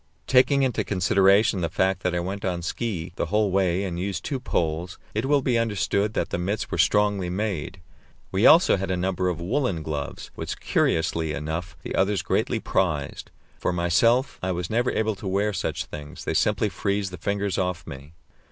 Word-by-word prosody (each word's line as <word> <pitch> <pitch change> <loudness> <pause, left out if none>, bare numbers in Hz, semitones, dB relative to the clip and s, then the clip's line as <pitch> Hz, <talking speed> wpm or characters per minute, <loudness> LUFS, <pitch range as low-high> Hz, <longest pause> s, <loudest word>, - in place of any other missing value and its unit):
Taking 135 +2 +4
into 130 -4 0
consideration 100 +2 +3
the 85 - 0
fact 95 0 0
that 90 -2 0
I - - +1
went 95 +3 -4
on 90 -2 -2
ski 90 -3 -3
the - - -1
whole 105 -1 +1
way 95 -1 +1
and 90 -3 -3
used 95 -1 -3
two 135 - -2
poles, 85 -6 -2 0.2
it 110 +4 -1
will 140 -1 +3
be 120 -3 +2
understood 105 -1 0
that - - -1
the - - -1
mits 100 +4 -2
were - - -2
strongly 105 -3 +2
made. 95 -2 -3 0.5
We 95 +4 +4
also 165 - +6
had 95 0 -3
a 95 - 0
number 90 0 0
of 85 -2 -3
woollen 95 - -1
gloves, 75 -2 -5
which, - - -5
curiously 80 -1 +1
enough, 80 +4 -4
the - - -5
others 95 0 +1
greatly - - 0
prized. 75 -7 -1 0.3
For - - 0
myself, 90 +10 +2
I 95 - -1
was 90 +1 -4
never 120 +3 +2
able 110 0 0
to 100 - -6
wear 100 +2 +1
such - - -2
things; 75 -1 -9
they - - -1
simply - - +2
freeze 100 -1 -2
the 90 - -7
fingers 100 +2 -1
off 90 -1 -2
me. 70 +3 -10
95 Hz, 190 wpm, -25 LUFS, 85-105 Hz, 0.5 s, also